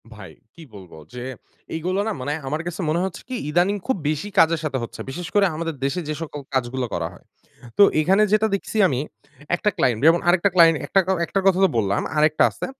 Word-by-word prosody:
ভাই, 95 -6 -11 0.2
কি 170 - -12
বলব 95 -3 -12 0.2
যে 125 -1 -6 0.5
এইগুলা 180 +5 -1
না 220 - -1
মানে 145 +3 -2
আমার 155 +4 -2
কাছে 175 +2 -5
মনে 165 +3 +1
হচ্ছে 190 - -6
কি 255 - -3
ইদানিং 175 +6 +2
খুব 260 - +1
বেশি 155 +7 -3
কাজের 165 0 +4
সাথে 140 -4 -2
হচ্ছে। - - -8
বিশেষ 175 +5 -6
করে 205 -1 +5
আমাদের 165 -1 -4
দেশে 160 +6 -1
যে - - 0
সকল 150 -2 -6
কাজগুলো 130 0 -1
করা 85 -1 -2
হয়। - - -18 0.5
তো - - +8 0.2
এইখানে 190 +7 +3
যেটা 215 +1 +4
দেখছি 200 - -4
আমি 130 -5 -1 0.6
একটা 210 - 0
ক্লায়েন্ট 120 -4 +1
যেমন 165 +1 +5
আরেকটা 185 +3 +3
ক্লায়েন্ট 165 -2 +6
একটাকাও 190 -1 +2
একটার 195 +3 -1
কথা 190 -1 +4
তো 190 - +5
বললাম। 100 -1 0
আরেকটা 155 0 +3
আছে। - - -6
165 Hz, 205 wpm, -22 LUFS, 135-190 Hz, 0.6 s, তো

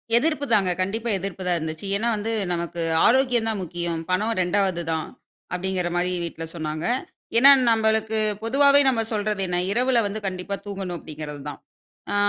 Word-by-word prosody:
எதிர்ப்பு 300 +2 +1
தாங்க. 195 -4 +4
கண்டிப்பா 225 +5 -2
எதிர்ப்பு 190 0 -5
தான் 175 -1 +2
இருந்துச்சு. 160 +4 -5
ஏனா 225 +4 0
வந்து, 215 +2 -3 0.2
"நமக்கு 170 0 -3 0.2
ஆரோக்கியம்தான் 240 -4 +2
முக்கியம். 170 -1 -3
பணம் 210 +5 +1
2வது 185 -1 +1
தான்." 160 -1 -2 0.5
அப்டிங்கிற 180 -1 -1
மாரி 180 +1 0
வீட்ல 165 -1 -5
சொன்னாங்க. 155 0 -4 0.5
ஏன்னா 275 +4 +9 0.2
நம்மளுக்கு 220 0 +1 0.3
பொதுவாவே 280 +4 +5
நம்ம 235 -4 +2
சொல்றது 210 -1 -1
என்ன? 175 0 -1
இரவுல 245 +2 +2
வந்து 215 +2 -4
கண்டிப்பா 185 +1 -4
தூங்கணும் 190 -3 -5
அப்டிங்கிறதுதான். 150 -2 -8 0.5
அ - - -1
195 Hz, 145 wpm, -24 LUFS, 175-225 Hz, 0.5 s, ஏன்னா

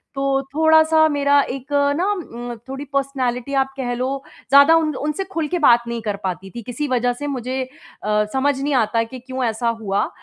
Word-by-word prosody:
तो 275 0 +1
थोड़ा-सा 315 0 +5
मेरा 285 -1 +3
एक 270 +2 -7 0.3
ना 360 - +1
उम, 240 - -6
थोड़ी 270 +2 -5
पर्सनैलिटी। 265 -2 -1
आप 270 0 +1
कह 245 -2 -2
लो 265 +2 -2 0.3
ज़्यादा 280 +4 +7
उन 315 -3 +1
उनसे 300 +8 -2
खुल 325 -4 -1
के 355 +3 -2
बात 240 -6 +5
नहीं 235 -1 -3
कर 210 -2 -2
पाती 190 +1 -4
थी 235 - -5
किसी 270 +6 -4
वजह 245 -1 +1
से 290 +4 -6
मुझे 260 -1 -3 0.4
अ, 210 0 +1
समझ 270 +1 +1
नहीं 290 0 0
आता 230 -1 +2
कि 255 +3 -9
क्यों 260 +1 -5
ऐसा 230 +1 -1
हुआ। 200 -1 0
265 Hz, 195 wpm, -21 LUFS, 240-285 Hz, 0.4 s, ज़्यादा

